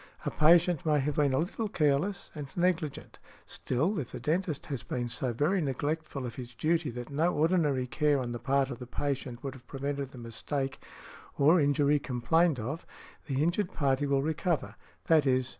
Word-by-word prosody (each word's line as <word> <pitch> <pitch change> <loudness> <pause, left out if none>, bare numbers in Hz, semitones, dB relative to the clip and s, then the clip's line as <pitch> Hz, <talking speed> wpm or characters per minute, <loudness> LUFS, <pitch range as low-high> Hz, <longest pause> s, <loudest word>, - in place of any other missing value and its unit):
A - - 0
patient 170 +1 +4
may 150 -2 +3
have 145 +2 0
been 145 -2 +3
a 130 - +1
little 205 +8 -1
careless 155 +2 0
and 150 -3 -6
negligent; 175 -4 -1 0.3
still, 160 - -1
if 130 - -5
the - - -6
dentist 155 +3 -1
has 135 -5 -4
been 120 -1 -3
so 120 +2 -2
very 155 - +1
neglectful 145 0 -2
of 120 - -5
his 125 -1 -8
duty 160 +2 +1
that 120 +2 -7
no 160 +5 +2
ordinary 150 -5 +2
care 150 +3 +2
on 125 -2 -3
the 120 - -4
part 135 +1 +1
of 120 - -6
the 125 - -8
patient 135 -1 -3
would 135 -2 -4
have 130 -3 -15
prevented 140 0 -3
the 135 - -13
mistake 135 +4 -4 0.6
or 155 +5 +5
injury 145 0 +3
complained 140 +5 +2
of, 135 +9 -4 0.4
the 135 0 0
injured 175 +3 0
party 140 0 +1
will 140 -1 +2
recover, 160 +2 -1 0.3
_i.e. 135 -5 +4
145 Hz, 180 wpm, -30 LUFS, 130-160 Hz, 0.6 s, or